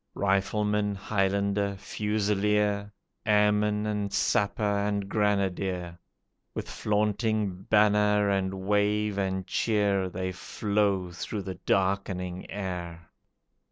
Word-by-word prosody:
Rifleman, 105 +1 +1
Highlander, 100 0 0
Fusilier, 105 0 0 0.3
Airman 105 0 +2
and 105 -1 -2
Sapper 100 +2 +1 0.2
and 100 -1 -1
Grenadier, 95 -4 -1 0.6
With - - -4
flaunting 105 -2 -1
banner 105 -1 +4
and 95 -1 -1
wave 105 0 +1
and 95 -1 -1
cheer, 100 -2 +1
They 95 +1 -3
flow 100 0 -1
through 100 +4 -5
the 95 -1 -6
darkening 95 -2 0
air. 85 -4 -5
100 Hz, 90 wpm, -28 LUFS, 95-105 Hz, 0.6 s, banner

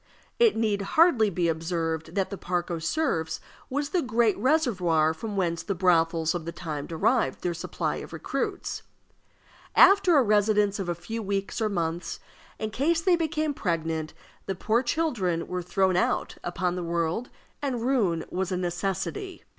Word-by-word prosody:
It 465 -3 +5
need 215 -3 +1
hardly 240 - +4
be 175 -2 0
observed 165 0 -2
that 195 0 0
the - - -3
Parc 175 0 -2
aux 170 - -2
Cerfs 160 - -1 0.3
was 285 +2 -1
the 355 +3 +1
great 235 -5 +2
reservoir 185 - +2
from 205 +5 -5
whence 170 -3 0
the 200 - -3
brothels 165 -2 +2
of 175 -3 -4
the 170 - -4
time 155 -4 -5
derived 160 -5 +1
their 175 - 0
supply 170 - -3
of - - -8
recruits. - - -3 0.9
After 390 -4 +7
a 275 - +6
residence 210 -1 +2
of 185 -3 -3
a 175 - 0
few 225 +7 -5
weeks 200 +2 -2
or 215 - +2
months, 170 -2 -2 0.4
in 215 0 -3
case 320 +8 +1
they 360 +1 +4
became 310 -2 -1
pregnant, 160 - -2 0.3
the 195 - -1
poor 220 +6 +1
children 240 - 0
were 180 0 -3
thrown 185 +1 +1
out 180 - 0
upon 175 0 -1
the 180 - -3
world, 170 +7 -1 0.3
and 255 -5 -2
ruin 210 -11 +1
was 190 +1 -2
a 180 - 0
necessity. 195 - -3
190 Hz, 165 wpm, -27 LUFS, 170-240 Hz, 0.9 s, After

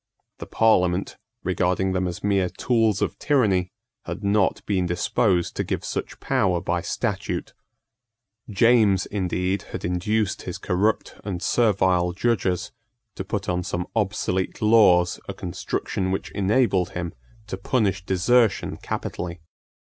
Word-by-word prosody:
The - - -7
Parliament, 95 -4 +2 0.3
regarding 95 +1 +1
them 95 -1 0
as 90 - -6
mere 100 -3 +2
tools 110 +2 +1
of - - -3
tyranny, 100 -11 +2 0.3
had - - -6
not 100 -1 +1
been 95 -3 0
disposed 95 0 +1
to - - +1
give - - -3
such - - -4
power 100 -10 +1
by 85 +1 -1
statute. - - -3 1.0
James 105 -2 +4
indeed 95 -1 -1
had - - -4
induced 95 +4 0
his - - -5
corrupt 100 +5 0
and 95 -4 -4
servile 95 -5 +2
judges 95 -3 0 0.4
to 95 - -5
put 100 +1 -4
on 90 0 0
some 90 -1 -3
obsolete 100 -3 -1
laws 105 -6 +4
a - - -4
construction 95 +1 -3
which 95 - -3
enabled 100 -2 +2
him 90 -1 -4 0.3
to 105 - -5
punish 95 -1 0
desertion 100 +5 +2
capitally. 85 -1 -5
95 Hz, 130 wpm, -24 LUFS, 90-105 Hz, 1.0 s, James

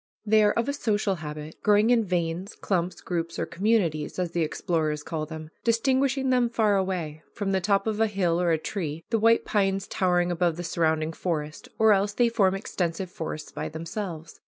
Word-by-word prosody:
They 215 0 +5
are 210 - +4
of 235 - 0
a 280 - 0
social 210 -7 0
habit, 150 0 -7
growing 210 +2 +4
in 235 -2 +4
"veins," 175 +1 -2
"clumps," 180 -2 -2
"groups," 170 -2 -3
or - - -1
"communities," 180 -7 0
as 180 -2 -1
the 170 - -1
explorers 155 -1 -1
call 155 -1 -4
them, 155 0 -8
distinguishing 265 +3 +2
them 250 -2 +3
far 220 -3 +2
away, 180 -6 -2
from 200 -2 -2
the 190 -1 +1
top 200 +1 +2
of 220 -1 -1
a 225 - +4
hill 180 -4 0
or 175 - +2
a 165 - +3
tree, 160 -2 -4
the 225 - +2
white 230 +1 +4
pines 195 -2 +1
towering 180 -1 +1
above 170 -1 +1
the 175 - -4
surrounding 160 -1 0
forest, 155 -3 -4
or 220 -1 +6
else 200 +1 +1
they 240 +2 +3
form 195 -5 +2
extensive 180 -2 -3
forests 155 -3 -6
by - - -4
themselves. 165 0 -6
185 Hz, 195 wpm, -26 LUFS, 165-210 Hz, -, or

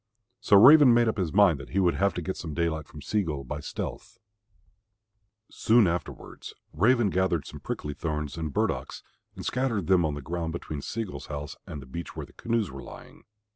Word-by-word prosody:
So 100 - +5
Raven 130 +2 +8
made 120 -1 +4
up 110 -2 -1
his 85 -4 -1
mind 95 -7 +4
that 70 - -10
he 100 - -1
would 90 -3 +3
have 100 +1 +1
to 90 - -3
get 95 +3 -3
some 80 -3 -6
daylight 80 -3 -1
from 75 -1 -11
Sea 105 - 0
gull 75 -7 -4
by 60 - -5
stealth. - - -6 1.3
Soon 115 0 +4
afterwards 85 0 -5 0.2
Raven 110 +4 +3
gathered 90 -5 0
some - - -9
prickly 75 - -5
thorns 75 -2 -4
and 80 -2 -4
burdocks - - -2 0.3
and - - -8
scattered 120 -7 -1
them 90 -1 +4
on 75 -2 -1
the 75 - -6
ground 85 +2 -3
between 75 -4 -5
Sea 115 +10 -3
gull's 100 - -8
house 75 0 -6
and 70 - -7
the - - -13
beach 85 +7 -7
where - - -5
the - - -21
canoes 115 -6 -1
were 70 0 -8
lying. - - -13
85 Hz, 205 wpm, -27 LUFS, 75-105 Hz, 1.3 s, Raven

